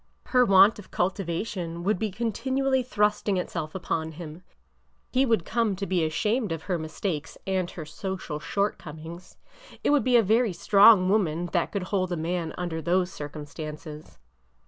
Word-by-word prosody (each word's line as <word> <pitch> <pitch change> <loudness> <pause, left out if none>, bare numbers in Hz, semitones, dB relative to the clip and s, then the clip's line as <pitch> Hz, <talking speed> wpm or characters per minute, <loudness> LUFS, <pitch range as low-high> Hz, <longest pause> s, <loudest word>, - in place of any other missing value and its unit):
Her 250 -1 +4
want 195 +1 +6
of 200 - -12
cultivation 175 -1 -2
would 200 0 +1
be 220 - -1
continually 260 +6 0
thrusting 210 -4 +1
itself 165 -3 -4
upon 160 -3 -2
him. 160 +1 -9 0.7
He 265 +1 +3
would 225 -8 +2
come 230 -4 0
to 195 +2 -4
be 185 -3 +1
ashamed 210 +7 0
of 165 -1 -4
her 180 -2 -1
mistakes 160 0 -4
and 185 -2 -1
her 160 -4 -8
social 170 -1 -5
shortcom 160 -4 -3
ings. 170 +2 -10 0.5
It - - +3
would 290 -2 +4
be 255 -1 +3
a 230 - +5
very 220 +1 +2
strong 200 0 +6
woman 175 -4 +1
that 175 -3 +1
could 200 -3 -2
hold 185 -1 -1
a 175 - -1
man 165 0 -2
under 175 -2 -3
those 180 +3 +1
circumstances. 150 +1 -8
185 Hz, 165 wpm, -26 LUFS, 165-210 Hz, 0.7 s, want